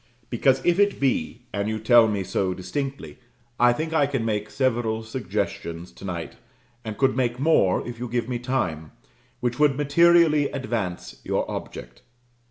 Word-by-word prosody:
Because, 130 +2 +2
if 175 +2 +3
it 205 0 +3
be, 125 -3 -1
and 100 +1 -1
you 110 - -2
tell 115 +1 +5
me 100 -3 -1
so 95 0 -1
distinctly, 135 +10 -5 0.4
I 120 0 +6
think 155 +6 -3
I 145 -3 +3
can 135 -5 -2
make 105 -1 -2
several 120 -4 0
suggestions 90 -7 -4
to - - -15
night, 85 -3 -5 0.5
and 110 -2 -6
could 135 -2 +2
make 125 -1 0
more 135 - +2
if 120 -1 -7
you 125 - -4
give 120 -1 -2
me 125 -1 -3
time, 90 - -2 0.5
which 120 +1 -2
would 145 -3 +4
materially 155 0 +4
advance 115 -10 -4
your - - -1
object. - - -7
120 Hz, 165 wpm, -24 LUFS, 105-140 Hz, 0.5 s, I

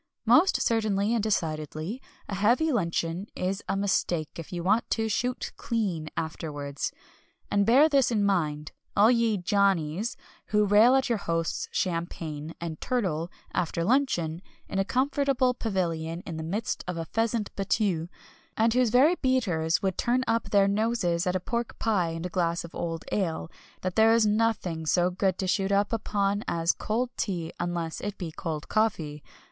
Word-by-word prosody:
Most 275 - +5
certainly 215 -2 +1
and 235 - +1
decidedly, 160 - -2 0.3
a - - -5
heavy 235 - +3
luncheon 170 - -1
is 190 +2 -2
a 195 - +1
mistake 175 -5 0
if 165 - -8
you 175 -2 -4
want 210 +5 +2
to 225 -1 0
"shoot 245 +4 -1
clean" 185 -9 -2
afterwards. 145 -3 -4 0.6
And 200 0 +2
bear 270 +7 +7
this 275 -4 +3
in 215 -4 +1
mind, 155 -6 0 0.3
all 215 +4 +7
ye 230 -3 +2
"Johnnies" 195 +1 +1 0.3
who 210 0 +3
rail 215 +6 +6
at 265 0 +2
your 235 -3 0
host's 165 -2 -2
champagne 165 -3 -3
and 165 -2 -5
turtle, 180 -10 -1 0.2
after 170 0 -1
luncheon, 175 - +1 0.3
in 195 - -2
a - - +3
comfortable 265 +2 +1
pavilion 170 -7 -2
in 165 - -5
the 160 - -4
midst 205 +8 -3
of 180 -1 -3
a 165 - -3
pheasant 225 +1 -1
battue, 195 -4 0 0.5
and 225 +1 +3
whose 250 -1 +3
very 260 +9 +5
beaters 180 - +1
would 190 -2 -1
turn 250 +2 +2
up 230 -1 0
their 200 -1 +4
noses 200 -4 0
at 180 - +1
a - - +1
pork 235 +5 -3
pie 200 -7 +1
and 165 +1 -5
a - - -2
glass 170 -1 0
of 170 - -10
old 165 -1 -4
ale, 165 -5 -1 0.3
that 185 -1 -3
there 225 +1 +6
is 230 -1 +4
nothing 210 -7 0
so 175 +2 +3
good 185 0 0
to 190 - -2
shoot 195 +1 0
upon 205 0 +1
as 170 0 +1
cold 240 +3 -2
tea, 175 -5 -2
unless 170 -2 -3
it 205 -1 -4
be 170 -4 -5
cold 155 -2 -5
coffee. 160 -9 0
195 Hz, 165 wpm, -27 LUFS, 165-225 Hz, 0.6 s, bear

